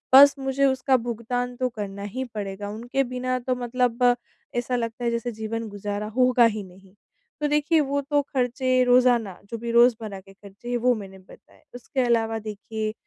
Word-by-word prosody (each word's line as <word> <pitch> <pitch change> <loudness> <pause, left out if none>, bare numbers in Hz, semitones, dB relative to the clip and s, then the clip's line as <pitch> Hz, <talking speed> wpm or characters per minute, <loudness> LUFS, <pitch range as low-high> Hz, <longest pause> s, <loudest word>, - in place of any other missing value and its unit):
बस 280 +1 +9
मुझे 270 +1 +1
उसका 265 0 +3
भुगतान 245 +1 -3
तो 255 0 -1
करना 200 -3 -6
ही 245 +6 -4
पड़ेगा, 205 -3 -6
उनके 240 +6 -1
बिना 255 0 -2
तो 255 +1 -1
मतलब 245 0 +2 0.4
ऐसा 245 +1 -1
लगता 235 0 -3
है 235 - +2
जैसे 235 +1 -2
जीवन 220 +1 -4
गुज़ारा 205 +1 -4
होगा 250 -1 +5
ही 215 -2 0
नहीं। 190 +1 -17 0.5
तो 295 - +2
देखिए 300 +2 +2
वो 285 -1 0
तो 290 -1 +3
खर्चे 255 -1 +1
रोज़ाना 245 -6 +3
जो 230 - -4
भी 235 +1 -4
रोज़मर्रा 230 -4 +3
के 195 +1 -17
खर्चे 200 +4 -12
हैं 245 - +1
वो 250 +1 +3
मैंने 195 -2 -9
बताए। 185 - -19
उसके 245 +2 -5
अलावा 225 -2 +1
देखिए 215 0 -5
240 Hz, 180 wpm, -25 LUFS, 215-255 Hz, 0.5 s, बस